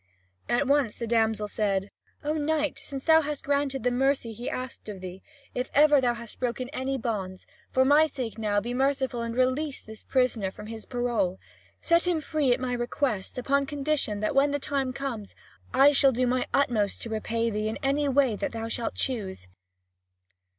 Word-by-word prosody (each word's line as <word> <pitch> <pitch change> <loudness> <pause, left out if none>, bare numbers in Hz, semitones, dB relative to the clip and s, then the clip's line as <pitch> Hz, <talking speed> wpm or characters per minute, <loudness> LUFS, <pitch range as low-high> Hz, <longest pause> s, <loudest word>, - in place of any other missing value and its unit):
At 240 +4 +2
once 275 -5 +2
the 235 - -4
damsel 220 -2 +1
said: 200 -2 -1 0.3
"O 300 +1 0
knight, 300 -1 0
since 275 -1 -6
thou 320 0 +6
hast 295 -1 -4
granted 280 -2 0
the 250 - +2
mercy 265 -2 +1
he 235 +3 -5
asked 255 -3 -6
of 200 -2 -6
thee, 185 +1 -8 0.3
if 250 +1 -2
ever 295 -1 +6
thou 240 -2 +2
hast 235 -1 -10
broken 250 0 -2
any 270 -1 -2
bonds, 200 -6 -4 0.2
for 260 0 +3
my 295 +3 +6
sake 250 -7 -5
now 205 -2 +1
be 240 +4 -4
merciful 265 -2 0
and 230 0 -3
release 260 +3 +1
this 220 0 -12
prisoner 250 -7 +1
from 190 - -10
his 220 0 -8
parole. 240 -7 -1 0.4
Set 335 +1 +3
him 345 -3 +2
free 300 -3 0
at 245 - +2
my 255 -1 -2
request, 240 -4 -2
upon 275 +2 +1
condition 280 -8 -1
that 215 - 0
when 275 +1 +4
the 285 - 0
time 275 -2 -1
comes, 245 -6 -5 0.4
I 275 +2 +6
shall 275 -1 +5
do 255 +1 +1
my 250 0 0
utmost 225 -8 +1
to 230 - -5
repay 230 +1 -1
thee 215 0 -1
in 220 - -3
any 280 +1 +1
way 265 -4 +3
that - - -3
thou 225 0 -4
shalt 230 0 -2
choose." 195 - -3
255 Hz, 190 wpm, -27 LUFS, 225-280 Hz, 0.4 s, thou